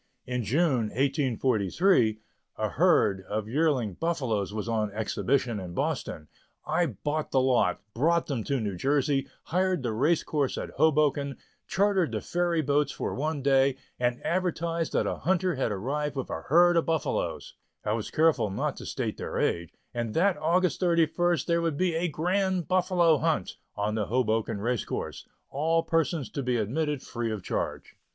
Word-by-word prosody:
In 125 -1 -2
June 130 - +2
1843, 130 - +2 0.4
a - - -1
herd 95 -1 +3
of 105 0 -2
yearling 130 - +1
buffaloes 125 - -1
was 105 +1 -4
on 110 -3 0
exhibition 115 +2 0
in 90 -2 -7
Boston. 75 -1 -2 0.4
I 170 +3 +1
bought 155 0 -3
the 130 - +2
lot, 130 -8 +2
brought 165 +7 +2
them 130 -7 -3
to 140 -2 0
New 105 -4 -2
Jersey, 140 +2 +1 0.2
hired 185 -2 0
the 115 -3 -1
race 150 +9 +2
course 145 -4 -1
at - - -5
Hoboken, 145 -2 +2 0.3
chartered 195 -3 +2
the - - 0
ferry 175 -2 0
boats 145 0 +1
for - - -3
one 150 0 -2
day, 135 -1 +3 0.2
and 120 0 0
advertised 170 -2 -1
that - - +2
a - - -2
hunter 185 0 +1
had 130 -5 -1
arrived 140 +9 -2
with 135 - -4
a - - -3
herd 175 +3 +5
of 165 - +1
buffaloes 160 -2 -2 0.3
I 105 - +1
was 110 -1 -3
careful 160 -9 +2
not 95 - -2
to - - -8
state - - -3
their - - -4
age 85 -1 0 0.2
and 115 -2 -3
that 185 +3 +3
August 170 +3 +1
31st 170 -2 +2
there 170 -1 +1
would 165 -4 -1
be 180 0 +1
a 165 +2 0
"Grand 180 +2 0
Buffalo 180 -4 +3
Hunt" - - -1 0.2
on 105 +1 -1
the 110 -2 -1
Hoboken 110 -4 0
race 120 0 0
course - - -5 0.2
all 165 +4 +1
persons 165 -2 0
to 140 - -3
be 125 -2 0
admitted 145 +6 -1
free 120 -1 -3
of 105 -4 -4
charge. - - -4
145 Hz, 170 wpm, -28 LUFS, 115-165 Hz, 0.4 s, herd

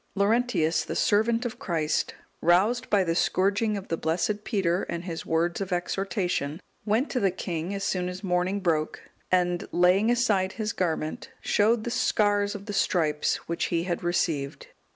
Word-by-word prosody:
Laurentius, 200 -5 +2
the - - -5
servant 230 +3 +2
of 240 0 -4
Christ, 165 - -1 0.3
roused 210 +9 +3
by 200 -2 +4
the 165 -2 0
scourging 200 +5 +1
of 195 - -8
the 165 - -1
blessed 185 +7 -1
Peter 190 -5 0
and 170 0 -3
his 170 -3 -6
words 170 +3 0
of 195 -1 -4
exhortation, 180 -4 -1 0.3
went 225 +7 +1
to 255 - 0
the 195 - +3
king 175 -1 -4
as 195 - -4
soon 180 -2 -1
as 180 +2 -7
morning 185 +2 0
broke, 160 -4 0 0.3
and 180 -1 +1
laying 180 +5 +4
aside 210 -6 +2
his 215 -1 -3
garment, 160 -3 -2
showed 220 +2 +2
the 240 - -3
scars 205 -5 +1
of 200 -1 -8
the 205 - -5
stripes 155 -6 +1
which 170 - -1
he 170 -1 0
had 175 -1 -2
received. 165 -5 -1
185 Hz, 170 wpm, -27 LUFS, 170-210 Hz, 0.3 s, by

